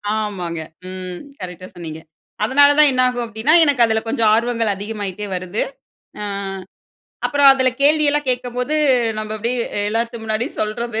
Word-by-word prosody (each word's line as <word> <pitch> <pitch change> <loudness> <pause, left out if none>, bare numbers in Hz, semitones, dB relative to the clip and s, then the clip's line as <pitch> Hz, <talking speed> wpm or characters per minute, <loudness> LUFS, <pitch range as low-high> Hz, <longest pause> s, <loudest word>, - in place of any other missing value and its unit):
ஆமாங்க. 185 -6 -3 0.3
ம். 185 -1 -7 0.2
கரெக்ட்டா 185 0 -7
சொன்னீங்க. 160 -2 -7 0.4
அதனால 285 +5 +5
தான் 300 -1 +7
என்ன 255 -1 +1
ஆகும் 245 -1 -3
அப்டீன்னா, 225 +6 +1
எனக்கு 280 -5 +3
அதுல 220 -1 0
கொஞ்சம் 225 -1 +2
ஆர்வங்கள் 230 -2 0
அதிகமாயிட்டே 205 -1 -5
வருது. 185 +3 -3 0.6
ஆ, - - -3 1.0
அப்பறம் 285 -1 +6
அதுல 260 -1 +2
கேள்வி 305 +2 +4
எல்லாம் 295 0 -1
கேக்கும்போது 250 +3 -2 0.4
நம்ப 215 0 -4
அப்டீயே 235 +3 -1 0.3
எல்லாத்து 230 +1 -2
முன்னாடியே 220 +5 -2
சொல்றது. 220 +1 -2
225 Hz, 140 wpm, -19 LUFS, 205-250 Hz, 1.0 s, தான்